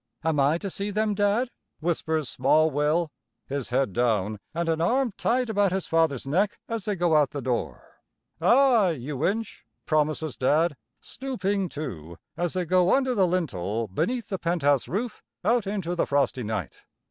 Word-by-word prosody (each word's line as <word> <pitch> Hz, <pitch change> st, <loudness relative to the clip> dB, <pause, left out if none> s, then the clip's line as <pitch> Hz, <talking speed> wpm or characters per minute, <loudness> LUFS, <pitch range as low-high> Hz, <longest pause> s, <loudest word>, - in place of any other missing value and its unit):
"Am 160 Hz, -2 st, +1 dB
I 140 Hz, +4 st, +3 dB
to 195 Hz, +2 st, -5 dB
see 200 Hz, +3 st, -3 dB
them, 210 Hz, +1 st, 0 dB
Dad?" 205 Hz, +5 st, +1 dB, 0.3 s
whispers 160 Hz, -2 st, -1 dB
small 155 Hz, +6 st, +3 dB
Will, 150 Hz, +3 st, +1 dB, 0.3 s
his 140 Hz, -2 st, -3 dB
head 125 Hz, -4 st, +1 dB
down 110 Hz, -3 st, 0 dB
and 170 Hz, +1 st, -2 dB
an 160 Hz, 0 st, 0 dB
arm 245 Hz, +6 st, +1 dB
tight 250 Hz, +2 st, +1 dB
about 205 Hz, -3 st, +2 dB
his 190 Hz, 0 st, -1 dB
father's 160 Hz, -6 st, +1 dB
neck 185 Hz, +9 st, +1 dB
as 230 Hz, -4 st, -3 dB
they 210 Hz, -, 0 dB
go 175 Hz, -3 st, +2 dB
out 150 Hz, -3 st, +4 dB
the 145 Hz, -, -5 dB
door. 125 Hz, -3 st, -4 dB, 0.4 s
"Ay, 240 Hz, -8 st, +5 dB
you 135 Hz, +3 st, -4 dB
inch," 220 Hz, +3 st, -3 dB, 0.2 s
promises 155 Hz, -1 st, 0 dB
Dad, 150 Hz, +4 st, +2 dB, 0.3 s
stooping, 200 Hz, -8 st, -2 dB
too, 85 Hz, -, -7 dB, 0.2 s
as 175 Hz, -1 st, -1 dB
they 185 Hz, -1 st, -1 dB
go 180 Hz, +1 st, +4 dB
under 260 Hz, -2 st, +1 dB
the 195 Hz, -5 st, +3 dB
lintel 115 Hz, -, -1 dB
beneath 235 Hz, -, -2 dB
the 190 Hz, -3 st, -3 dB
penthouse 145 Hz, -7 st, +1 dB
roof, 210 Hz, -, -3 dB, 0.2 s
out 230 Hz, -1 st, +2 dB
into 195 Hz, -4 st, -2 dB
the 175 Hz, -, 0 dB
frosty 140 Hz, -2 st, +1 dB
night. 105 Hz, -, -4 dB
165 Hz, 170 wpm, -26 LUFS, 140-205 Hz, 0.4 s, Ay